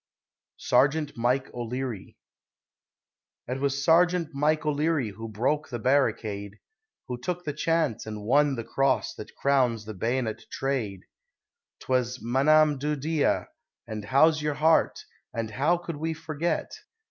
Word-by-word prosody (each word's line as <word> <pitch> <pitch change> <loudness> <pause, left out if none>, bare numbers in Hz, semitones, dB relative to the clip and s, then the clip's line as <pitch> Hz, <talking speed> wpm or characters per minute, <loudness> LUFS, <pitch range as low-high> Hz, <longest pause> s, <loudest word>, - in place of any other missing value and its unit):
SERGEANT 145 +2 +2
MIKE 125 +3 0
O'LEARY 120 -2 -5 1.3
It 130 +2 -3
was 140 0 0
Sergeant 170 -1 +3
Mike 150 +2 +1
O'Leary 150 -4 +1
who 115 +3 -8
broke 130 +8 -1
the 120 - -3
barricade, 110 -5 0 0.5
Who 125 -1 -4
took 180 +7 -3
the 150 - -3
chance, 155 -7 0
and 105 -1 -6
won 140 +5 +3
the 115 - -4
Cross 135 +3 0
that 105 - -9
crowns 125 -6 +1
the 110 - -6
bayonet 115 +3 -2
trade; 120 -9 -2 0.8
'Twas 125 -1 0
"M'anam 145 +4 +3
do 150 +2 -1
Dhia," 150 +2 0 0.4
and 110 -2 -6
"How's 155 +6 +4
your 150 -1 -1
heart," 160 +1 +2 0.3
and 115 -2 -3
"How 150 +10 +2
could 170 -3 -6
we 160 +2 -2
forget?" 160 +1 -2
135 Hz, 135 wpm, -27 LUFS, 120-155 Hz, 1.3 s, How's